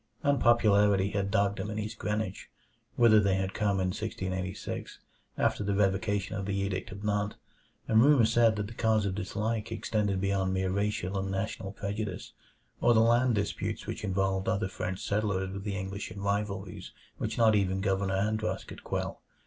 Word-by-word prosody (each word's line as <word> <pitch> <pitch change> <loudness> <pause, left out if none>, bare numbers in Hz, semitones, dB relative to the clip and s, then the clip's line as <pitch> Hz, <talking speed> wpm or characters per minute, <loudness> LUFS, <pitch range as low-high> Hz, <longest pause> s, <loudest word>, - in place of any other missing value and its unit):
Unpopularity 105 -7 +4
had 100 -1 -1
dogged 100 -1 +1
them 100 +2 -3
in 105 - -4
East 110 +1 -4
Greenwich, 105 -1 -3 0.5
whither 115 -3 +6
they 100 -2 +2
had 95 0 -2
come 100 -2 +1
in 95 -1 +1
1686, 95 -2 -4 0.4
after - - +1
the 100 0 0
revocation 100 +1 +1
of 100 -1 -3
the 100 -1 -1
Edict 100 -1 -2
of 100 +2 -8
Nantes, 105 0 -1 0.5
and 110 0 +5
rumor 140 -5 +6
said 115 -1 +4
that 105 -1 -2
the 110 - -8
cause 110 -2 +2
of 100 - -1
dislike 105 +3 -2
extended 105 -3 0
beyond 95 -1 0
mere 95 0 0
racial 100 -1 -1
and 95 0 -2
national 95 0 -3
prejudice, 100 0 -5 0.5
or 120 0 +4
the - - +6
land 120 +2 +4
disputes 100 -1 -2
which - - -5
involved 95 -1 0
other 105 -1 0
French 95 -1 -4
settlers 100 -2 0
with 95 0 -6
the 100 -1 -2
English 100 +1 -5
in 95 +1 -8
rivalries 100 -1 -3 0.3
which - - -3
not 115 -2 +5
even 95 -2 +1
Governor 95 0 0
Andros 110 +2 -1
could - - -11
quell. - - -3
100 Hz, 175 wpm, -29 LUFS, 95-110 Hz, 0.5 s, whither